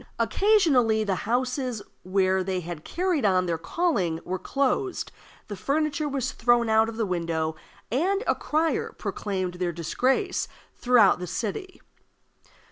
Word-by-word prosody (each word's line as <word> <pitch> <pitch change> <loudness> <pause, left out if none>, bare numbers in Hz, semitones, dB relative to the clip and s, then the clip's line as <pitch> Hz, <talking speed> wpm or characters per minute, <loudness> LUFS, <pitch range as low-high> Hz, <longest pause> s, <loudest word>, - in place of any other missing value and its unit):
Occasionally, 285 - +3
the 200 -2 0 0.2
houses 250 -2 -1 0.2
where 190 0 +1
they 185 -1 -2
had 170 -2 -7
carried 355 -4 -1
on 185 -3 +3
their 170 -2 -1
calling 180 - 0
were 185 +1 -3
closed, 280 - -1 0.4
the 205 - -5
furniture 300 +5 -1
was 270 -1 -2
thrown 240 0 +2
out 220 0 +4
of 225 - -8
the 225 - +1
window, 165 -3 -1 0.4
and 380 - +1
a - - +3
crier 315 +2 -1
proclaimed 185 -3 -3
their 180 -1 0
disgrace 255 - 0 0.3
throughout 240 -7 +4
the 180 - -5
city. 235 - -4
225 Hz, 135 wpm, -26 LUFS, 185-285 Hz, 0.4 s, out